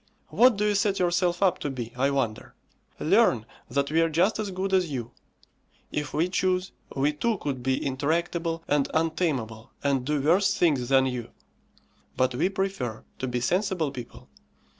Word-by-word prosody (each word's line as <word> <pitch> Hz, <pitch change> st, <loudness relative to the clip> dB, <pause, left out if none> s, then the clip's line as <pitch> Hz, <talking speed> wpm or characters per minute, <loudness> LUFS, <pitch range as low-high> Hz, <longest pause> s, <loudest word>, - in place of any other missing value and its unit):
What 245 Hz, -2 st, +5 dB
do 210 Hz, -, +1 dB
you 210 Hz, -, +2 dB
set 200 Hz, 0 st, +1 dB
yourself 175 Hz, +1 st, +1 dB
up 185 Hz, -3 st, +3 dB
to 145 Hz, -, -3 dB
be, 120 Hz, -3 st, -6 dB
I 135 Hz, +2 st, +2 dB
wonder? 125 Hz, -6 st, -2 dB, 0.4 s
Learn -, -, +3 dB, 0.2 s
that 140 Hz, +3 st, 0 dB
we 165 Hz, +1 st, +3 dB
are 165 Hz, -, +2 dB
just 180 Hz, +8 st, +2 dB
as 210 Hz, -2 st, -2 dB
good 190 Hz, +1 st, -3 dB
as 185 Hz, -3 st, +3 dB
you. 120 Hz, -4 st, -4 dB, 0.8 s
If 150 Hz, 0 st, -3 dB
we 160 Hz, +4 st, +1 dB
chose 185 Hz, 0 st, 0 dB, 0.2 s
we 140 Hz, +2 st, +1 dB
too 220 Hz, +9 st, 0 dB
could 140 Hz, -7 st, -4 dB
be 130 Hz, +1 st, -1 dB
intractable 165 Hz, +4 st, -1 dB
and 145 Hz, -1 st, +1 dB
untameable 155 Hz, -9 st, -1 dB
and 140 Hz, -2 st, +1 dB
do 150 Hz, +3 st, 0 dB
worse 190 Hz, +8 st, +3 dB
things 140 Hz, -8 st, +2 dB
than 135 Hz, -1 st, +5 dB
you; 125 Hz, -3 st, -3 dB, 0.9 s
but 130 Hz, 0 st, +2 dB
we 160 Hz, +9 st, +1 dB
prefer 190 Hz, -, -3 dB, 0.2 s
to 130 Hz, -, -2 dB
be 125 Hz, -1 st, -2 dB
sensible 180 Hz, -, 0 dB
people. 125 Hz, -4 st, -10 dB
155 Hz, 170 wpm, -26 LUFS, 130-185 Hz, 0.9 s, What